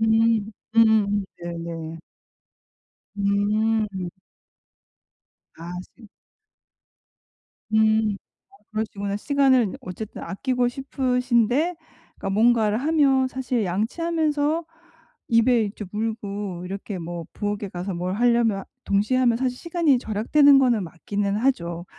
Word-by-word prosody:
음. 225 -1 +3 0.3
음. 210 -3 +4 0.2
네네. 165 -1 -6 1.2
음. 205 -1 0 1.5
아 165 +2 -8 0.3
시 220 - -13 1.7
음 220 -1 +3 0.4
어 395 - -20
그러시구나. 205 -2 -3
시간을 260 -2 +2
어쨌든 190 +4 -7
아끼고 250 +4 -1
싶으신데 250 +3 +1 0.4
그러니까 - - -4
뭔가를 220 +1 +3
하면 275 -3 +3
사실 255 -3 -2
양치하면서 300 - 0 0.6
입에 230 +1 +4
이제 210 +1 -6
물고 205 -4 -4
이렇게 195 +1 -5
뭐 170 0 -6
부엌에 205 -1 -3
가서 185 +2 -4
뭘 180 +2 -2
하려면 235 -3 +2 0.2
동시에 205 +6 +1
하면 240 -3 +3
사실 255 -1 -1
시간이 335 -5 +2
절약되는 270 +6 +4
거는 240 -6 +2
맞기는 200 +4 -3
하죠. 175 -9 -1
220 Hz, 225 characters per minute, -24 LUFS, 200-255 Hz, 1.7 s, 음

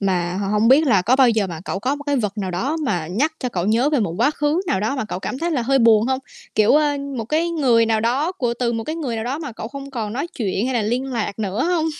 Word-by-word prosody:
mà 180 -3 0
h 200 - -2
hông 215 +2 +3
biết 295 +4 +5
là 200 -8 +4
có 245 +7 +3
bao 265 -2 +6
giờ 220 -4 +1
mà 165 -3 -7
cậu 190 - -3
có 260 +6 0
một 290 - -9
cái 285 - +1
vật 210 -4 -2
nào 190 -2 -2
đó 260 - -1
mà 175 -11 -1
nhắc 265 - 0
cho 250 - -2
cậu 180 -5 -2
nhớ 235 +7 +2
về 290 - +2
một 185 -6 -1
quá 285 - +4
khứ 300 +3 0
nào 190 - 0
đó 225 +7 -1
mà 260 - -2
cậu 200 - -5
cảm 255 +7 -5
thấy 340 +2 -1
là 270 -7 0
hơi 270 +3 +2
buồn 225 -1 +5
hông? 260 0 0 0.4
Kiểu, 215 0 +4
ơ, 295 -1 +2 0.2
một 225 - -3
cái 320 +7 0
người 250 -8 +3
nào 220 -1 +1
đó 270 +10 0
của 245 -9 -2
từ 240 -2 0
một 225 -1 -3
cái 315 +1 -4
người 260 -8 -3
nào 220 - -3
đó 270 +5 -2
mà 290 -7 -6
cậu 220 0 -7
không 275 +1 -8
còn 220 -5 -4
nói 275 +7 -2
chuyện 205 - -2
hay 260 - -2
là 230 - +1
liên 245 +5 -1
lạc 225 -5 -3
nữa 210 +3 -1
hông? 345 -3 +1
240 Hz, 305 wpm, -21 LUFS, 210-280 Hz, 0.4 s, bao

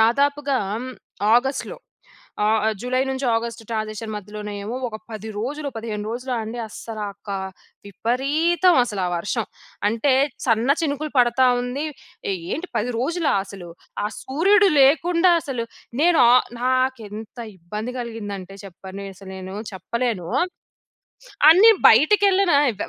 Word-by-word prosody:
దాదాపుగా 280 +4 +2 0.8
ఆగస్ట్‌లో 265 - -2 0.7
ఆహ్, 215 0 +2 0.2
జులై 255 +1 0
నుంచి 265 0 -2
ఆగస్ట్ 230 0 -2
ట్రాన్సిషన్ 215 0 -4
మధ్యలోనే 210 +1 -7
ఏమో 225 +4 -4
ఒక 215 - -6
10 220 0 -6
రోజులు, 285 +6 -3
15 220 -2 -4
రోజులు 250 +2 -4
అండి. 220 +2 -6
అస్సలా 215 0 -6 0.2
కా 200 -1 -2 0.5
విపరీతం 295 - +2
అసలా 205 -6 -3
ఆ - - -5
వర్షం. 205 +6 -2 0.4
అంటే 230 +6 +1 0.3
సన్న 230 +1 +2
చినుకులు 300 0 -2
పడతా 250 +1 +4 0.2
ఉంది. 255 +5 -3 0.5
ఏంటి? 190 - -4
10 245 +4 -1
రోజులా? 320 +6 0
అసలు 195 -3 -10 0.4
ఆ - - +1
సూర్యుడు 390 +9 +4
లేకుండా 335 +6 +4
అసలు 250 -6 -4 0.4
నేను 340 -1 +4
ఆహ్, 250 - +5 0.2
నాకేంత 245 -4 -1 0.2
ఇబ్బంది 210 +8 -6
కలిగిందంటే 205 -5 -6
చెప్పను 190 +1 -9
అసలు 190 0 -11
నేను 190 +1 -7 0.2
చెప్పలేను. 230 -3 -2 1.2
అన్ని 435 +6 +8 0.2
బయటకెళ్ళిన 390 - +4 0.2
ఎ - - -16
240 Hz, 120 wpm, -22 LUFS, 210-280 Hz, 1.2 s, అన్ని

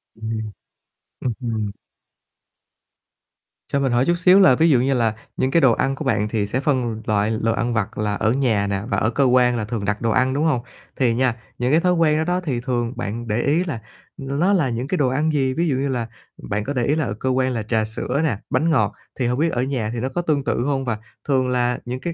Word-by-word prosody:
Ừm, 110 -1 -4 0.7
ừm 125 - -1
hừm. 110 -4 -2 2.0
Cho 140 - 0
mình 135 -2 +1
hỏi 120 +2 +2
chút 175 - +2
xíu 180 +2 +6
là 130 -9 +7
ví 165 +5 +3
dụ 135 -5 +5
như 135 +3 +1
là 115 -4 +1 0.2
những 130 - 0
cái 165 - +4
đồ 130 -4 +6
ăn 135 +4 0
của - - -6
bạn 105 -1 +1
thì 105 -2 -1
sẽ 125 - -1
phân 125 -6 -1
loại 105 0 +1
l 115 0 -1
ăn 120 0 -1
vặt 110 -4 -2
là 105 -1 -1
ở 110 - +1
nhà 115 -6 +1
nè 100 -1 -1
và - - 0
ở 110 - +1
cơ 140 +4 +1
quan 125 -1 +4
là 110 - -2
thường 105 -2 -4
đặt 105 +1 -1
đồ 115 - +1
ăn, 130 +2 +2
đúng 145 - 0
hông? 150 -7 +2 0.3
Thì 120 -4 +2
nha, 125 -1 +1 0.2
những, 125 +1 +1
cái, 155 - +5
thói 180 +1 +2
quen 160 -3 +3
đó 160 - +1
đó 180 +2 0
thì 145 -9 -2
thường 120 -2 -2
bạn 120 0 -4
để 110 +3 0
ý 160 +6 +2
là 140 -11 -5 0.4
n 135 +1 -3
nó 190 +5 +3
là 160 -10 +2
những, 120 +3 -3
cái, 180 - -1
đồ 140 - +2
ăn 150 +5 +1
gì, 135 -2 +1
ví 170 +5 0
dụ 140 - +1
như 135 +2 -1
là, 125 -4 -2 0.4
bạn 105 +1 -1
có 140 - -3
để 125 -3 0
ý 145 - +2
là 155 -3 0
ở - - -3
cơ 130 +5 -3
quan 130 0 +1
là 115 -3 -2
trà 110 0 0
sữa 125 +6 -2
nè, 140 -10 0
bánh 165 +2 +1
ngọt, 160 - +2 0.3
thì 125 - +1
hông 125 +2 -1
biết 165 +1 +2
ở 125 +1 0
nhà 130 -5 -2
thì 120 - -3
nó 130 +3 -2
có 155 +7 -2
tương 155 -5 0
tự 120 - 0
hông? 135 -2 -1
Và 115 -3 -1 0.3
thường 130 -2 +2
là 125 -1 +1
những 125 +1 -4
cái 170 +5 -4
125 Hz, 265 wpm, -21 LUFS, 115-140 Hz, 2.0 s, là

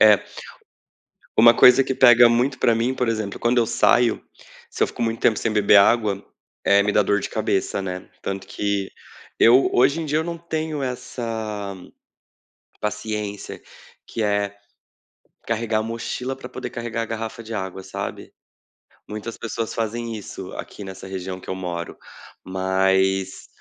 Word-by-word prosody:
É 105 -2 +7 1.2
uma 115 +1 +8
coisa 125 +2 +7
que 130 - -2
pega 120 -2 +7
muito 125 +3 +1
pra 115 - +3
mim, 120 +3 0
por 125 -2 -1
exemplo, 110 -3 -3
quando 120 +1 +1
eu 115 - +3
saio, 120 +1 +3 0.5
se - - 0
eu - - +2
fico - - -8
muito 115 0 -1
tempo 110 - +3
sem 115 - -1
beber 105 -1 +5
água, 100 -1 +3 0.4
eh, 100 0 +5
me 105 - +1
dá 105 - +4
dor 105 +1 +2
de - - -5
cabeça, 100 -2 -1
né. 90 -1 -6
Tanto 95 0 -5
que, 100 -1 -2 0.5
eu 125 +4 +6
hoje 140 +6 +3
em - - -4
dia 150 +1 0
eu - - -1
não 170 0 -4
tenho 160 -3 -3
essa 110 -5 -4 1.1
paciência 105 -1 -4 0.4
que 115 - -4
é, 100 -1 0 0.9
carregar 115 -1 0
a - - -2
mochila 115 +3 -4
pra 135 - -10
poder - - -6
carregar 120 -1 -3
a - - -4
garrafa 115 +1 -5
de 115 +1 -8
água, 95 -2 -5
sabe. - - -6 0.7
Muitas 110 +2 -6
pessoas 115 0 -4
fazem 115 +1 -3
isso 105 - -8
aqui, 105 - -8
nessa 95 0 -9
região 95 -1 -5
que - - -12
eu 95 - -2
moro, 85 -2 -5 0.5
mas, 95 0 0
110 Hz, 160 wpm, -22 LUFS, 100-120 Hz, 1.2 s, uma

